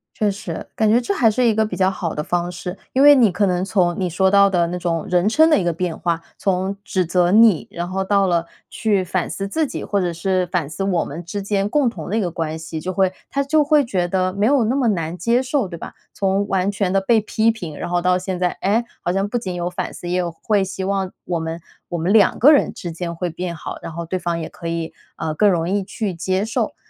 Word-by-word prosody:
确 210 -1 +1
实， 200 +1 -6
感 220 - +2
觉 230 +3 +4
这 245 - -3
还 230 - +3
是 250 +4 0
一 225 -3 +3
个 220 - +2
比 215 - -5
较 185 0 +2
好 175 -3 -3
的 150 - -2
方 175 +1 -1
式。 180 +1 -6 0.2
因 265 - +3
为 290 +1 +9
你 230 -8 +5
可 195 +2 +1
能 180 0 0
从 180 -4 +1
你 185 - 0
说 190 +3 +2
到 200 0 +6
的 175 -3 +1
那 180 - -3
种 170 -2 -2
人 180 +2 +2
称 315 +9 +5
的 305 - +4
一 - - -1
个 175 -1 0
变 175 0 -3
化， 170 -1 -1 0.2
从 190 +1 -1
指 185 -2 0
责 175 +1 +2
你， 220 -5 +5
然 175 +1 -4
后 190 +1 -1
到 195 0 +2
了 170 -2 +1 0.2
去 205 -4 0
反 180 0 -2
思 195 0 -4
自 315 +10 0
己， - - -5
或 200 - 0
者 175 -2 -1
是 185 +1 0
反 165 -5 -1
思 195 +4 -4
我 185 -3 +1
们 165 +5 -7
之 200 +4 -4
间 200 0 0
共 275 +2 +2
同 170 -9 -8
的 210 - -1
一 - - +1
个 180 - -1
关 160 -1 -3
系。 160 0 -6
就 185 +4 -4
会 190 0 +2 0.2
他 280 0 0
就 300 +2 +3
会 295 0 +4
觉 185 -7 -1
得 185 0 0
没 200 +1 0
有 270 0 +4
那 240 +4 0
么 265 -4 +1
难 170 -3 -2
接 235 +8 +2
受， 260 -4 0
对 170 -2 -8
吧？ - - -8 0.2
从 195 +1 0
完 190 0 +1
全 195 -2 -1
地 195 - +3
被 220 +3 +3
批 220 +1 +1
评， 175 -9 -4
然 - - -4
后 175 0 +1
到 180 +1 +2
现 185 0 -4
在， 180 -1 +1
诶， 220 +5 +2 0.2
好 175 - -1
像 195 +2 0
不 240 +4 -2
仅 185 -5 -5
有 175 0 -2
反 180 - -4
思。 175 - -8
也 180 +1 0
有 175 -1 -1
会 205 -3 +2
希 190 0 -5
望 195 -1 -1
我 175 -2 -1
们 160 +1 -4 0.3
我 175 - -2
们 175 +5 0
两 210 -3 +5
个 285 +6 +7
人 290 - +4
之 175 - -6
间 170 0 -5
会 175 0 -3
变 175 0 -4
好， - - -7
然 - - -7
后 170 +1 -5
对 185 +2 -3
方 170 -1 -2
也 160 - -4
可 170 - -9
以 165 -1 -3 0.2
呃， 155 - -3
更 205 +5 +4
容 170 -2 +1
易 200 +1 0
去 200 0 -4
接 185 +4 -1
受。 225 - -2
185 Hz, 290 characters per minute, -20 LUFS, 175-210 Hz, 0.3 s, 为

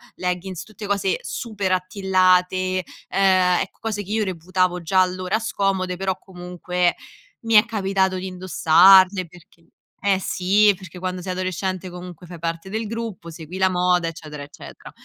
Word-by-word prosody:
leggings 180 0 -3
tutte 215 -1 -9
cose 200 -1 0
super 205 -5 -3
attillate, 185 -1 +1 0.3
ehm, 185 -2 +3
ecco - - -6
cose 215 -2 -3
che 195 - -14
io 220 0 +1
reputavo 180 0 -1
già 185 +3 +3
allora 185 +2 0
scomode, 195 -4 -1
però 190 0 -2
comunque 180 -1 -2 0.5
mi 225 - 0
è 210 +1 +7
capitato 195 -4 0
di 185 +1 -4
indossarle 185 +1 +5
perché 170 0 -20 0.4
eh 195 -1 +3
sì, 200 +3 +3
perché 185 -2 -12
quando 185 0 -4
sei 185 - -4
adolescente 185 0 -3
comunque 180 -1 -10
fai 175 -1 -9
parte 165 +3 -4
del 220 +1 -2
gruppo 225 -6 -6
segui 165 +3 -9
la 190 0 +4
moda 180 -1 +1
eccetera, 155 -3 -8
eccetera. 145 - -12
185 Hz, 150 wpm, -22 LUFS, 180-195 Hz, 0.5 s, è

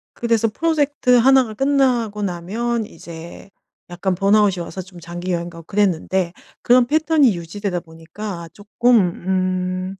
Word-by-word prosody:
그래서 230 -1 +1
프로젝트 290 0 0
1 265 +2 +5
가 220 - -7
끝나고 245 -5 +1
나면 215 +6 -2
이제 170 +3 -11 0.4
약간 180 +1 -1
번아웃이 200 0 +3
와서 185 +3 -7
좀 180 -1 -13
장기 175 +2 -6
여행 170 0 -2
가고 165 0 -11
그랬는데 190 -2 0 0.3
그런 245 0 +5
패턴이 305 - +3
유지되다 180 +1 -4
보니까 170 +2 -8
쪼끔 235 +5 +2
음. 185 0 -1
200 Hz, 295 characters per minute, -20 LUFS, 175-235 Hz, 0.4 s, 1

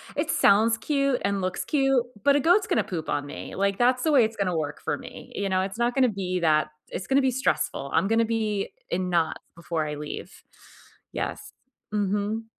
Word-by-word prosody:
it - - -1
sounds 225 +3 +4
cute 275 +2 0
and 200 -1 0
looks 185 0 -2
cute, 270 -4 +2 0.2
but 280 0 +5
a - - +4
goat's 355 +8 +4
gonna 220 - +2
poop 165 -4 -5
on 145 0 -1
me," 145 - -8
like, 200 0 0
that's 250 +1 +3
the 315 - +2
way 265 -5 +6
it's 220 0 -1
gonna 180 -4 0
work 150 -1 -3
for - - -1
me, - - -11
you 200 -1 -1
know, 185 0 +2
it's 195 +3 -4
not 240 +1 +1
gonna 255 -2 +4
be 185 -3 -2
that 155 -2 +3 0.2
it's 185 - -5
gonna 275 +1 +4
be 260 -1 +2
stressful, 240 - -1
i'm 190 - +3
gonna 225 +1 +3
be 215 -3 -1 0.2
in 185 -1 -1
knots 165 -2 0
before 165 -2 -3
I 150 - -4
leave. 150 0 -6 0.8
Yes. - - -4 0.4
Mhm. 205 +2 -1
205 Hz, 205 wpm, -26 LUFS, 180-245 Hz, 0.8 s, way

